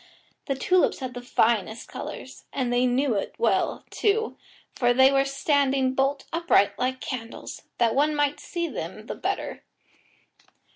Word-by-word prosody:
The 275 - 0
tulips 360 +7 +2
had 260 -2 -5
the 245 - -6
finest 225 -2 +1
colours, - - -8
and 250 -3 -1
they 245 +1 +3
knew 255 +1 +1
it 200 - -3
well, 470 - +1
too, 440 +2 +1 0.4
for 245 -1 +2
they 265 +1 +7
were 275 0 +3
standing 275 -1 +1
bolt 275 +1 0
upright 325 - +3
like 260 +1 -1
candles, 235 -4 -6 0.2
that 230 -2 +3
one 300 +2 +2
might 290 0 +1
see 340 -1 -3
them - - -6
the - - -4
better. - - -3
265 Hz, 150 wpm, -26 LUFS, 245-285 Hz, 0.4 s, they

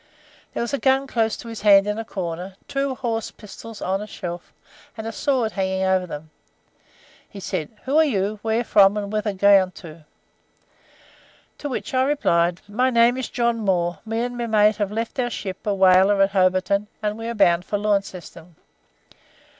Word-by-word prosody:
There - - -1
was 235 - -5
a 280 - 0
gun 270 0 +2
close 225 -4 0
to 235 - -10
his 225 -1 -7
hand 200 -2 +6
in 210 +1 -2
a - - -3
corner, 185 -2 -5
two 275 -1 -2
horse 230 -4 -3
pistols 220 +1 -11
on 190 +2 -1
a 210 - -7
shelf, 175 -4 -7 0.5
and 220 - -6
a 225 - -3
sword 245 -1 0
hanging 190 -1 -1
over 190 -1 +1
them. 155 -1 -8 1.0
He 200 - -10
said: 180 -4 -4
'Who 275 +3 0
are 320 - +7
you, 210 -7 -1
where 225 +1 0
from, 205 -2 +4
and 205 0 -4
whither 210 -1 -1
bound?' 190 -2 +4
to 165 - -15
which 220 -4 -5
I 255 - +3
replied: 180 -11 +1
"'My 250 +5 +1
name 235 0 +4
is 260 -1 -4
John 235 -1 0
Moore; 175 -4 0
me 225 +1 -2
and 245 0 -3
my 240 -1 -3
mate 215 -1 +3
have 205 -2 -1
left 225 +4 -4
our 245 -1 +1
ship, 195 -3 -6
a 205 - +1
whaler, 190 +1 +5
at 195 - +1
Hobarton, 185 +1 +1 0.2
and 210 0 -1
we 225 +1 -6
are 235 - -3
bound 175 -4 +3
for 205 - -1
Launceston.' 195 -5 -3
210 Hz, 185 wpm, -22 LUFS, 190-230 Hz, 1.0 s, are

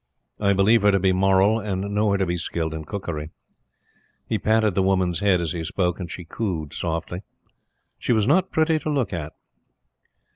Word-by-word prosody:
I 100 -1 +3
believe 100 +4 +4
her 105 - +4
to 100 - +2
be 95 0 +2
moral, 95 +3 +3
and 100 -3 -3
know 105 +1 +2
her 100 - +2
to 95 - +1
be 90 0 -1
skilled 80 -1 -3
in 80 -1 -6
cookery." 80 -5 -5 1.0
He - - -1
patted 110 -2 +2
the 95 - +1
woman's 95 -2 +1
head 100 -3 +3
as 85 -3 -2
he 85 -1 -3
spoke, 90 +2 -1
and 90 -3 -5
she 90 +1 -7
cooed 80 -6 -4
softly. 85 +2 -3 0.8
She - - -1
was 110 -2 +2
not 180 +7 +3
pretty 160 0 +2
to 155 - -4
look 135 -9 -1
at. 80 -2 -5
95 Hz, 190 wpm, -23 LUFS, 85-105 Hz, 1.0 s, believe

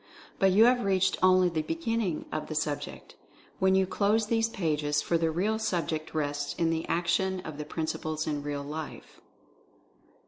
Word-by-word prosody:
But 195 -1 +4
you 210 +5 +6
have 245 0 +4
reached 190 -1 +2
only 185 0 +5
the 165 -3 -1
beginning 230 - -2
of 155 - -3
the 155 - -5
sub 150 -1 -1
ject, - - -10 0.5
when 190 0 +4
you 190 0 +4
close 210 +3 +1
these 225 +1 +1
pages, 150 -7 0
for 170 - 0
the 165 -1 +2
real 200 +7 0
subject 165 -7 -2
rests 145 -1 -2
in 165 -1 +1
the 165 0 -2
action 175 +2 +1
of 155 -4 -8
the 150 - -4
principles 155 0 -3
in 150 -2 -2
real 145 -1 -4
life. 150 +2 -8
170 Hz, 175 wpm, -29 LUFS, 155-195 Hz, 0.5 s, you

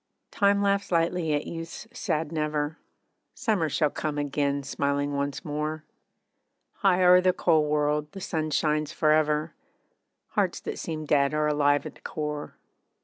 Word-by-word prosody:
Time 200 0 +3
laughs 200 -1 +1
lightly 165 -1 +1
at 145 - -2
youth's 165 +4 -7
sad 160 -9 -2
'Never,' 150 -1 -2 0.6
Summer 190 -9 0
shall 150 0 +1
come 150 -1 -3
again, 140 -1 -1
smiling 140 +1 -1
once 140 0 -3
more, 150 +1 -3 0.9
High 185 -3 +3
o'er 180 0 +7
the 185 0 +3
cold 155 -4 +2
world 150 0 0
the 195 - -7
sun 160 -4 -2
shines 150 0 0
for 155 -1 +2
ever, 155 0 +2 0.8
Hearts - - 0
that - - -5
seemed 155 -2 -5
dead 140 0 +3
are 150 0 +1
alive 145 -1 +2
at - - -6
the - - -21
core. 150 -1 -5
150 Hz, 150 wpm, -27 LUFS, 145-165 Hz, 0.9 s, o'er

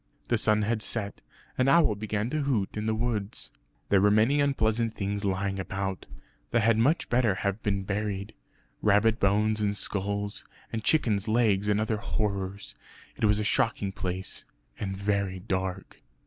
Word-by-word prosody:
The - - +3
sun 105 0 +3
had 110 +1 0
set; 105 -2 -2 0.4
an 130 - +3
owl 155 -5 +5
began 110 +2 -3
to 155 - 0
hoot 125 -9 0
in 105 +1 -2
the 110 - +1
wood. 110 -2 -2 0.5
There 100 -1 +4
were 105 - +5
many 115 +8 +4
unpleasant 115 -5 +1
things 100 +1 -2
lying 95 0 -1
about, 95 0 -4 0.4
that 120 - +2
had 110 0 +3
much 145 +9 +2
better 120 -5 +2
have 100 +2 -2
been 100 -2 -1
buried; 100 0 -3 0.5
rabbit 105 +2 +3
bones 105 +2 +2
and 100 -1 0
skulls, 100 +1 -2 0.3
and 110 -1 -2
chickens' 110 -9 +2
legs 110 -3 +2
and 105 0 +2
other 110 0 0
horrors. 100 -3 -3 0.4
It - - 0
was 105 0 +3
a - - 0
shocking 105 -2 +1
place, 95 0 -4 0.4
and 95 -1 -3
very 100 -1 -1
dark. 95 0 -4
105 Hz, 160 wpm, -28 LUFS, 100-110 Hz, 0.5 s, owl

